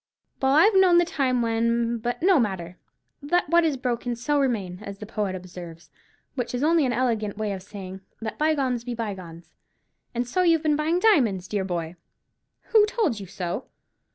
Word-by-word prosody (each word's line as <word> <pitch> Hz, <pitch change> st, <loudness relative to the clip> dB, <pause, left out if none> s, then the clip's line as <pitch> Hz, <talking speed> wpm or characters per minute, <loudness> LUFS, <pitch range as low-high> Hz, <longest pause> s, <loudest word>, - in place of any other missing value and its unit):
Well, 265 Hz, 0 st, +3 dB
I've 410 Hz, +8 st, +6 dB
known 375 Hz, -2 st, +6 dB
the 345 Hz, -, +5 dB
time 260 Hz, -7 st, 0 dB
when——But 235 Hz, +2 st, 0 dB
no 370 Hz, -4 st, +5 dB
matter, 185 Hz, -6 st, -3 dB, 0.4 s
'let 350 Hz, +5 st, +1 dB
what 340 Hz, 0 st, +5 dB
is 310 Hz, -4 st, +1 dB
broken, 245 Hz, -1 st, -2 dB
so 285 Hz, +5 st, 0 dB
remain,' 205 Hz, -10 st, -1 dB
as 200 Hz, -, -7 dB
the 210 Hz, -, -8 dB
poet 205 Hz, -3 st, -3 dB
observes; 175 Hz, -3 st, -10 dB, 0.4 s
which 250 Hz, -2 st, -3 dB
is 250 Hz, -, -2 dB
only 320 Hz, -2 st, +3 dB
an -, -, 0 dB
elegant 225 Hz, -5 st, -1 dB
way 215 Hz, -1 st, -2 dB
of 190 Hz, -1 st, -5 dB
saying, 190 Hz, -1 st, -9 dB, 0.2 s
'Let 220 Hz, -1 st, -6 dB
bygones 275 Hz, -6 st, +1 dB
be 245 Hz, 0 st, -4 dB
bygones.' 185 Hz, -7 st, -7 dB, 0.6 s
And 240 Hz, +1 st, -1 dB
so 365 Hz, +9 st, 0 dB
you've 335 Hz, -3 st, +3 dB
been 305 Hz, -1 st, +2 dB
buying 315 Hz, +4 st, +1 dB
diamonds, 240 Hz, -, +3 dB
dear 205 Hz, -1 st, -1 dB
boy?" 170 Hz, -2 st, -4 dB, 0.7 s
"Who 440 Hz, -2 st, +6 dB
told 420 Hz, -, 0 dB
you 195 Hz, -, -8 dB
so?" 185 Hz, +3 st, -4 dB
235 Hz, 180 wpm, -25 LUFS, 195-300 Hz, 0.7 s, I've